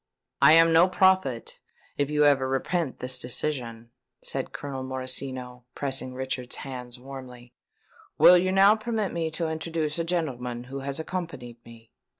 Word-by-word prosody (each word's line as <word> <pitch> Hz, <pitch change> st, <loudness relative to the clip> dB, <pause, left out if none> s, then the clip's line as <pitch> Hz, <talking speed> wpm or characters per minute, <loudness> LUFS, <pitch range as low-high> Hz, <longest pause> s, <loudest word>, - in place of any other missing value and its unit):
"I 155 Hz, -, +8 dB
am 165 Hz, 0 st, +6 dB
no 170 Hz, +3 st, +6 dB
prophet, 185 Hz, -11 st, +1 dB, 0.4 s
if 145 Hz, 0 st, -1 dB
you 150 Hz, 0 st, +3 dB
ever 135 Hz, -2 st, +3 dB
repent 135 Hz, +2 st, -1 dB
this 125 Hz, 0 st, -3 dB
decision," 120 Hz, -3 st, -4 dB, 0.3 s
said -, -, -4 dB
Colonel 135 Hz, -2 st, -6 dB
Morosino, 130 Hz, -1 st, -4 dB
pressing 135 Hz, -2 st, -1 dB
Richard's 130 Hz, -1 st, -4 dB
hands 125 Hz, -2 st, -8 dB
warmly. 125 Hz, -2 st, -11 dB, 0.6 s
"Will 180 Hz, 0 st, +8 dB
you 185 Hz, +1 st, 0 dB
now 195 Hz, +2 st, +6 dB
permit 220 Hz, -2 st, -2 dB
me 165 Hz, -1 st, -1 dB
to 165 Hz, +1 st, -3 dB
introduce 160 Hz, -1 st, -3 dB
a -, -, +1 dB
gentleman 125 Hz, -8 st, -3 dB
who 135 Hz, +2 st, -7 dB
has 140 Hz, +2 st, -4 dB
accompanied 160 Hz, -9 st, -6 dB
me?" 115 Hz, -1 st, -16 dB
135 Hz, 150 wpm, -26 LUFS, 125-165 Hz, 0.6 s, I